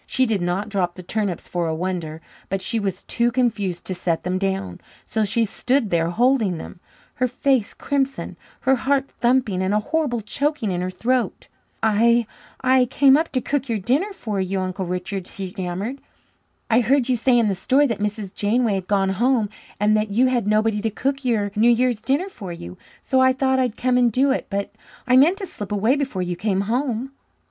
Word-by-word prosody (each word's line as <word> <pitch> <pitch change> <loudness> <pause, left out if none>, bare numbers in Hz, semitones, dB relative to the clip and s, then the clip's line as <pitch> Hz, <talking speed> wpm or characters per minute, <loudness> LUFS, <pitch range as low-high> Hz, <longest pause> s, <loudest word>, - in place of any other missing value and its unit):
She 260 - +2
did 215 -5 0
not 180 +4 -1
drop 180 -4 -1
the 185 - -9
turnips 200 -2 -2
for 175 -1 -2
a 160 - -1
wonder; 165 -2 -4 0.3
but 195 0 -2
she 230 +2 0
was 195 -3 -3
too 235 0 0
confused 220 -8 -1
to 185 - -2
set 175 -2 -1
them 185 +1 -1
down, 190 - -2 0.2
so 220 - -1
she 225 +3 +1
stood 250 +2 0
there 165 -1 +2
holding 225 -2 +2
them, 165 - -9 0.4
her 255 - +2
face 255 -2 0
crimson, 275 -1 -2 0.3
her 265 0 +3
heart 275 +2 0
thumping, 240 -6 +2
and 190 +2 +1
a - - +3
horrible 290 -1 -1
choking 280 0 -1
in 175 -1 -2
her 180 - -2
throat. 245 +7 -1 0.3
"I 230 +2 +4 0.4
I 255 0 +4
came 270 +2 +5
up 320 +3 +1
to 255 - +1
cook 275 -1 -2
your 225 - +1
dinner 270 - 0
for 215 - -4
you, 190 +1 -1
Uncle 185 0 -3
Richard," 180 +1 -4
she 190 -2 -5
stammered. 190 +8 -4 0.7
"I 230 - +4
heard 255 +2 +2
you 255 - +2
say 245 +1 +3
in 230 -2 +3
the 200 - +1
store 265 +10 +2
that 230 -6 -2
Mrs. 210 -1 -3
Janeway 220 +1 +1
had 190 -2 -3
gone 195 -2 +2
home 230 +2 +1 0.3
and 210 +1 +3
that 215 0 0
you 230 +6 +3
had 245 -5 +1
nobody 215 0 +2
to 225 - 0
cook 275 +6 -2
your 215 -5 0
New 225 +3 +4
Year's 240 -1 +2
dinner 285 +8 0
for 200 - -8
you. 90 - -8 0.3
So 265 - +2
I 260 0 +5
thought 265 0 +1
I'd 250 -4 0
come 250 0 +2
and 240 -1 +3
do 265 +5 +3
it, 270 - -2
but 200 -1 -2 0.3
I 255 - +3
meant 310 +9 +5
to 405 - -4
slip 205 - -8
away 215 +6 +2
before 265 -10 -2
you 175 0 -3
came 195 +1 0
home." 245 +3 -1
220 Hz, 205 wpm, -22 LUFS, 195-255 Hz, 0.7 s, came